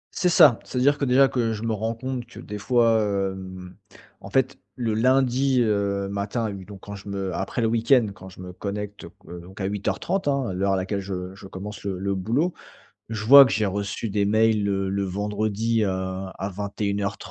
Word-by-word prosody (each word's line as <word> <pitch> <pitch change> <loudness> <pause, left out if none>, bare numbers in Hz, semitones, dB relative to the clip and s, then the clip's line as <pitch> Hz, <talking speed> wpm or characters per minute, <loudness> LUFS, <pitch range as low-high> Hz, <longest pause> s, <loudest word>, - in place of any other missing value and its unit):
C'est 180 - +2
ça, 155 -9 +6
c'est-à-dire 140 +3 +1
que, 140 - +1
déjà, 135 +2 +5
que 115 -4 0
je 110 +1 -6
me 115 -1 0
rends 110 +2 -2
compte 130 0 -4
que, - - -12
des 105 0 -7
fois, 115 -1 +3
hem, 95 -2 -3 0.5
en - - -9
fait, 130 0 +1 0.2
le 115 -4 -1
lundi, 130 +2 +2
heu, 100 -2 0
matin, 100 +4 -2
à - - -1
huit 95 -2 -8
donc 100 -2 -11
quand 100 - -9
je 100 +1 -10
me 95 -2 -3
après 95 +7 -3
le - - +3
week-end, 115 +1 +3
quand 95 0 -12
je 90 - -16
me 90 -1 -8
connecte, 105 +1 -6
qu 90 - -10
donc 95 +3 -13
à 95 - -2
08:30, 105 - -2
hein, 135 -8 0
l'heure 95 +1 +1
à - - +3
laquelle 95 +2 -2
je 95 -1 -5
je 95 - -11
commence 95 +1 -8
le 100 -1 -2
le 100 +2 -3
le - - 0
boulot, 125 - 0 0.6
je 110 -1 -4
vois 140 +4 +10
que 125 - -1
j'ai 105 +1 +1
reçu 100 +2 -3
des 100 0 +1
mails 110 0 +3
le 95 -1 0
le 100 0 -1
vendredi, 105 +3 -1
à 95 0 -3
à 95 - -2
21:30. 100 0 -3
105 Hz, 210 wpm, -24 LUFS, 95-115 Hz, 0.6 s, vois